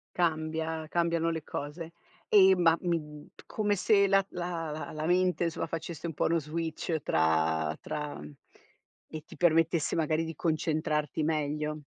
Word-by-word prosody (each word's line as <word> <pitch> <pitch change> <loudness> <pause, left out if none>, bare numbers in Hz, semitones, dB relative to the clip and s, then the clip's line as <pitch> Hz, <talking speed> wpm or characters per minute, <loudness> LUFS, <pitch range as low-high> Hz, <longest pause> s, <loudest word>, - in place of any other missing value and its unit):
Cambia, 160 -1 -1
cambiano 170 -1 +1
le 160 -1 -2
cose. 160 +4 -6 0.3
E 190 -2 +7
ma 165 -2 +4
mi 150 -4 -3 0.2
come 210 -1 0
se 200 0 +4
la 195 0 +3
la 165 -3 -4
la 155 0 -4
mente 180 0 +2
insomma 165 - -2
facesse 165 0 -6
un 165 - -5
po' - - -1
uno 165 0 +2
switch 160 +1 -3
tra 80 -1 +1
tra 150 -1 -4
mhmm, - - -9 0.8
e 155 -1 -7
ti - - -13
permettesse 165 -1 +2
magari 160 0 +1
di 165 0 -6
concentrarti 155 -1 -1
meglio. 150 0 -1
160 Hz, 145 wpm, -29 LUFS, 150-170 Hz, 0.8 s, E